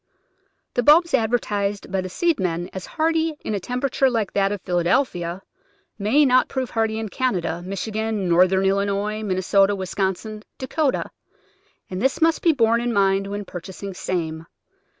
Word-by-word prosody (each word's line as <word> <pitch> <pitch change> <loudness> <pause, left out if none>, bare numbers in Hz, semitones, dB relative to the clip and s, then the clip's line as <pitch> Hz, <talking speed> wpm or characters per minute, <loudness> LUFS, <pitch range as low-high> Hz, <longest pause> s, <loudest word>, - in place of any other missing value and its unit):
The 245 - +1
bulbs 330 +7 +5
advertised 210 -5 0
by 190 -1 0
the 185 - -6
seedsmen 185 - -1
as 190 -1 -6
hardy 325 0 0
in - - -2
a 200 - -1
temperature 250 +5 0
like 225 -5 -1
that 195 0 +2
of 205 - -3
Philadelphia 175 0 0 0.6
may 245 +9 +3
not 255 -1 +4
prove 260 -2 -3
hardy 220 -1 0
in 220 0 -3
Canada, 180 -9 -1
Michigan, 210 +1 -3
Northern 185 +2 +4
Illinois, 200 +2 0
Min 195 -4 -1
nesota, 195 +2 +3
Wisconsin, 190 +3 -3 0.2
Dakota, 270 +2 -1 0.8
and 185 +1 -5
this 265 +2 +1
must 325 0 +3
be 335 - +5
borne 235 -4 +2
in 240 0 -1
mind 195 -2 +2
when 205 0 -5
purchasing 190 +2 -7
same. 165 -3 -3
205 Hz, 150 wpm, -22 LUFS, 190-245 Hz, 0.8 s, bulbs